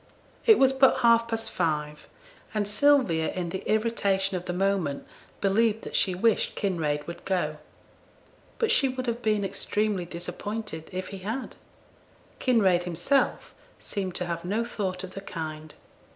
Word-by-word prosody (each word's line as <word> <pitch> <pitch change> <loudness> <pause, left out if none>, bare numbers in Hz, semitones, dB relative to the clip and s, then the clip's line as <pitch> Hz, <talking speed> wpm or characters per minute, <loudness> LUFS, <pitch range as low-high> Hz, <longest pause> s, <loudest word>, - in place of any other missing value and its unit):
It 440 -2 +8
was 265 0 +5
but 265 0 +4
half 230 -1 +5
past 225 -1 -3
five, 150 -3 -2 0.5
and 205 -1 +1
Sylvia 210 - +3
in 180 -2 -3
the 190 +2 -4
irritation 200 -3 +1
of 180 0 -4
the - - -2
moment 180 -6 0 0.4
believed 220 +2 +2
that - - -6
she 185 - +2
wished 225 +4 +1
Kinraid 155 -7 -1
would 170 - -8
go. 165 -5 -1 1.0
But 455 -2 +1
she 270 - +4
would 255 0 -4
have 235 0 -2
been 210 -3 +1
extremely 205 -1 -1
disappointed 180 +1 -6
if 185 0 -4
he 195 - -7
had. 220 +8 -4 0.8
Kinraid 200 -9 +3
himself 180 - 0 0.3
seemed 190 -3 -4
to 180 - 0
have 170 -1 -4
no 210 +6 -1
thought 190 -4 -3
of 185 - -7
the 195 - -7
kind. 155 -4 -7
195 Hz, 150 wpm, -27 LUFS, 175-225 Hz, 1.0 s, It